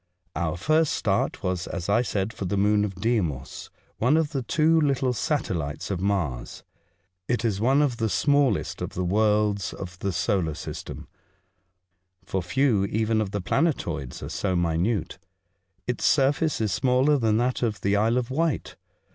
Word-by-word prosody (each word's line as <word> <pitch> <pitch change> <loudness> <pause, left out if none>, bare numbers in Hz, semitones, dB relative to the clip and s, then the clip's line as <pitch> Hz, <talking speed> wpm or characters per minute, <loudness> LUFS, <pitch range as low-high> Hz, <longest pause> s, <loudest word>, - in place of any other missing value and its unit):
Our 85 -1 -1
first 155 - +2
start - - -1
was, 90 -1 -2
as 90 -3 -4
I 105 +4 +3
said, 105 -3 -2
for 100 - -5
the 100 +3 -1
moon 105 +1 +3
of 100 -2 -3
Deimos, 90 - -2 0.3
one 130 +7 +3
of 160 -2 0
the 135 -4 -2
two 160 +5 +3
little 135 -3 +1
satelhtes 90 - -2
of 95 - -2
Mars. 85 -12 -2 0.6
It 120 -1 0
is 105 -3 0
one 135 +5 +4
of 130 -5 0
the 110 -1 0
smallest 145 +3 +1
of - - -5
the 90 - -1
worlds 105 +1 +1
of 90 -1 -8
the 100 - -1
solar 90 -2 0
system, - - -7 1.2
for 95 - -2
few 100 +2 +2
even 110 +2 0
of 105 - -2
the 100 0 -3
plane 160 - +2
toids 75 - -6
are - - -5
so 95 -2 -1
minute. 85 +3 0 0.7
Its 125 -1 -3
surface 145 +2 +2
is 110 -3 0
smaller 130 +5 +3
than 110 -2 +2
that 125 +2 0
of 110 -4 -1
the 100 +1 +1
Isle 110 +4 +2
of 125 0 -2
Wight. 160 +1 -1
105 Hz, 170 wpm, -25 LUFS, 95-130 Hz, 1.2 s, one